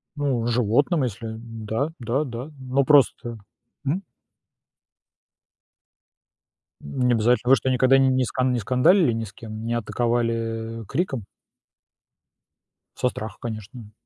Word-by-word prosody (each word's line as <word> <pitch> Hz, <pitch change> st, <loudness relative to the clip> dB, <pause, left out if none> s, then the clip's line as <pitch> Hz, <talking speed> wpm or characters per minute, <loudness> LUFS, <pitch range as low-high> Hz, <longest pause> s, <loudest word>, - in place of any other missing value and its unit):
Ну, 135 Hz, -5 st, 0 dB
животным, 125 Hz, -, +2 dB
если 115 Hz, -1 st, -4 dB
да 115 Hz, +4 st, -3 dB
да 120 Hz, +5 st, 0 dB
да. 125 Hz, +3 st, -6 dB
Ну, 130 Hz, +1 st, +1 dB
просто 120 Hz, -5 st, +3 dB, 0.5 s
мгм. 165 Hz, +8 st, -1 dB, 2.8 s
М, 125 Hz, -, -1 dB
не 120 Hz, -, +4 dB
обязательно. 120 Hz, +2 st, +2 dB
Вы 135 Hz, -, +8 dB
что, 130 Hz, -, -1 dB
никогда 130 Hz, +1 st, +4 dB
не 135 Hz, 0 st, +4 dB
не 130 Hz, -1 st, +2 dB
скан 130 Hz, +1 st, 0 dB
не 120 Hz, -, 0 dB
скандалили 130 Hz, -, +4 dB
ни 115 Hz, 0 st, -2 dB
с 100 Hz, -2 st, -9 dB
кем, 110 Hz, 0 st, -8 dB
не 120 Hz, -, -1 dB
атаковали, 120 Hz, 0 st, 0 dB, 0.5 s
а, -, -, -10 dB
криком? 135 Hz, -, -2 dB, 1.7 s
Со 125 Hz, -, +1 dB
страха, 110 Hz, -3 st, -7 dB
конечно. 110 Hz, 0 st, -7 dB
120 Hz, 130 wpm, -24 LUFS, 115-135 Hz, 2.8 s, Вы